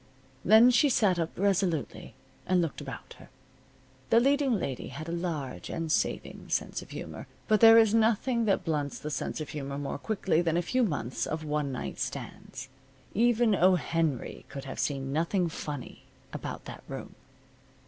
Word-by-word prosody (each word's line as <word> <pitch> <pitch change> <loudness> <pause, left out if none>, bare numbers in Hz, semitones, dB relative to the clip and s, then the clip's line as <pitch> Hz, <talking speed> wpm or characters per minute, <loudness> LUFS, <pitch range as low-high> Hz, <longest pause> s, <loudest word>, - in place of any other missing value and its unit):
Then 220 +6 +7
she 265 +4 +4
sat 200 -8 +3
up 165 -1 -3
resolutely, 185 -5 -1 0.3
and 185 0 +3
looked 165 -7 -2
about - - -8
her. - - -15 0.8
The 230 - +6
leading 275 0 +3
lady 135 - -3
had 155 +3 -7
a - - -4
large 155 - -4
and 165 -1 -3
saving - - -2
sense - - -1
of - - -13
humor. - - -7 0.2
But 215 -1 +4
there 225 0 +9
is 220 -2 +5
nothing 230 +2 +2
that 200 -3 +1
blunts 150 -4 -1
the 150 - -6
sense - - -3
of 155 - -6
humor 140 -2 -5
more 145 0 -4
quickly 190 -3 0
than 165 -1 +1
a 175 - +1
few 255 +9 0
months 135 - -2
of 155 0 -3
one 150 -2 -1
night 130 - -5
stands. - - -6 0.5
Even 235 0 +3
O. 185 0 +5
Henry 165 -5 -2
could 140 0 -7
have 135 - -7
seen 135 -1 -2
nothing 170 +4 +1
funny 145 -4 -7 0.3
about - - -6
that - - -9
room. - - -7
170 Hz, 170 wpm, -29 LUFS, 150-220 Hz, 0.8 s, there